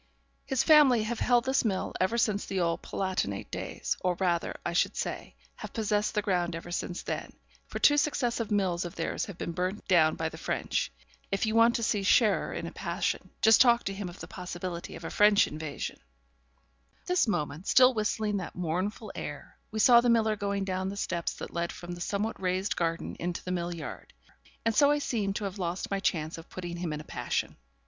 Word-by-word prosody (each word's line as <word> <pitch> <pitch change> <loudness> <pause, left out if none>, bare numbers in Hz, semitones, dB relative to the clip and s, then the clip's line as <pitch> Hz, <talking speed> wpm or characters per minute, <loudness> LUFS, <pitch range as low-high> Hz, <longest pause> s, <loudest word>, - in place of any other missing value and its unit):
'His 265 -3 +1
family 285 -8 +6
have 225 +1 -3
held 245 -1 +3
this 265 +1 +2
mill 200 -5 -1
ever 190 +6 +2
since 210 -3 +1
the 190 - -2
old 170 -1 0
Palatinate 185 - -2
days; - - -3
or 180 -1 +1
rather, 175 -2 0
I 170 - -1
should 175 - +2
say, - - -4 0.2
have - - -8
possessed 210 -1 0
the 210 - +1
ground 175 -3 0
ever 165 +1 -7
since 175 0 -3
then, - - -4 0.3
for - - -5
two 290 - +5
successive 245 -6 0
mills 190 -4 +1
of 175 - -7
theirs 165 +9 -2
have 200 -6 -9
been - - -3
burnt 185 +4 -3
down 160 -4 +4
by 160 - -2
the 160 - -11
French. - - -1 0.4
If 195 +2 +1
you 215 - -1
want 230 +1 +5
to 235 - -1
see 210 -2 +1
Scherer 205 +2 +3
in - - -4
a - - -5
passion, - - -2
just 220 0 +7
talk 240 -2 +5
to 195 - -3
him 195 -2 -5
of 175 - -12
the - - -7
possibility 175 -1 -6
of 165 - -10
a - - -5
French 210 0 +5
invasion.' 150 -1 -5 1.0
But - - -35
at - - -37
this 360 -7 +3
moment, 155 -3 -2
still 255 0 +6
whistling 215 -1 0
that 185 - -6
mournful 180 +6 -2
air, - - -7
we 220 - -6
saw 235 +2 +7
the 240 - +2
miller 220 -2 +3
going 200 -1 -2
down 190 0 -2
the 200 - -6
steps 170 -4 -2
that - - -8
led 170 0 -1
from 175 0 -8
the 175 0 -7
somewhat 205 +4 -2
raised 185 +1 0
garden 165 -1 -2
into 175 0 -3
the 180 - -4
mill 175 -1 -2
yard; 160 - -8 0.5
and 230 - +2
so 285 +6 +5
I 295 - +3
seemed 210 -8 -1
to 210 - -3
have 200 0 -4
lost 175 +2 -3
my 195 - 0
chance 165 -4 -1
of 165 - -13
putting 175 -1 -6
him 170 -2 -3
in 150 0 -4
a - - -11
passion. - - -3
195 Hz, 215 wpm, -29 LUFS, 175-220 Hz, 1.0 s, just